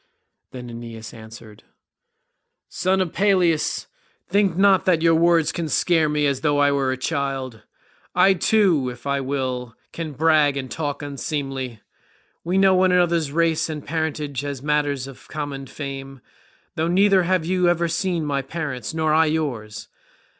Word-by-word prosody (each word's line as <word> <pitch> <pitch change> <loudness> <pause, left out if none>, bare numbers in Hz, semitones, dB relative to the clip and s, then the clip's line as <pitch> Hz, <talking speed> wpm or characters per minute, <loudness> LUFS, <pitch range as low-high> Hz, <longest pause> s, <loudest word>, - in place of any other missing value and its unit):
Then 125 -1 -9
Aeneas 115 -1 -9
answered, 110 -1 -12 1.1
"Son 190 +1 0
of 180 -3 -2
Peleus, 180 -5 +1 0.4
think 200 -4 +1
not 195 -1 +4
that 170 -3 +2
your 165 0 +5
words 165 -1 +3
can 165 -1 -4
scare 160 +1 +2
me 150 0 +1
as 140 -2 0
though 145 -2 +1
I 145 0 +4
were 135 -2 +1
a 130 - -2
child. 135 -4 -3 0.5
I 195 - +5
too, 180 -8 +2
if 125 +1 -11
I 140 0 0
will, 130 -3 -3 0.2
can 160 -3 -5
brag 150 -1 +3
and 130 -2 -5
talk 145 -2 -3
unseemly. 135 -4 -4 0.6
We 180 +3 0
know 195 0 +5
one 185 0 +3
another's 170 -4 +2
race 165 0 +1
and 150 -2 -6
parentage 150 -3 -3
as 140 -2 -5
matters 145 -3 0
of 135 -2 -13
common 145 -3 -5
fame, 135 -2 -7 0.5
though 160 +1 -1
neither 195 +2 +4
have 180 -1 0
you 180 0 +2
ever 170 0 +1
seen 170 -1 -1
my 140 -2 -1
parents 140 -4 -5
nor 160 -1 +1
I 160 +1 +4
yours. 130 -9 -3
150 Hz, 155 wpm, -22 LUFS, 135-170 Hz, 1.1 s, your